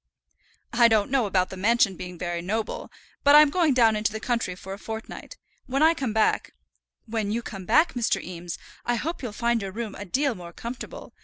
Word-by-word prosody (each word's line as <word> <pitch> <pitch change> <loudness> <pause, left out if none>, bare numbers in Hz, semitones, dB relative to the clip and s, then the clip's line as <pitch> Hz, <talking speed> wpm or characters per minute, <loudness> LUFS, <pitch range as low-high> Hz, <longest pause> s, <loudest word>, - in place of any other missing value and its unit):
"I 235 0 +6
don't 220 0 +2
know 260 -5 +2
about 185 -2 +1
the 190 - -7
mansion 215 0 +3
being 180 0 -8
very 175 0 -3
noble, 215 +5 -3 0.3
but 285 0 +7
I'm 300 -1 +8
going 325 -5 +2
down 225 -3 +5
into 215 0 0
the 220 - -4
country 230 -6 -1
for 190 +1 -8
a 195 - -8
fortnight. 220 +1 -7 0.3
When 275 +3 +1
I 325 +1 +6
come 265 -8 -2
back 220 0 +1 0.3
" - - -66 0.2
"When 220 -2 -2
you 235 +2 -1
come 195 -4 -7
back, 325 +1 +4
Mr. 245 -3 +1
Eames, 175 -1 -7 0.3
I 240 - 0
hope 325 +8 -3
you'll 245 -5 -4
find 235 +1 0
your 195 -1 -4
room 220 +1 -5
a 205 - -7
deal 270 +8 +1
more 175 -4 -10
comfortable. 235 +6 -8
225 Hz, 215 wpm, -26 LUFS, 195-245 Hz, 0.3 s, I'm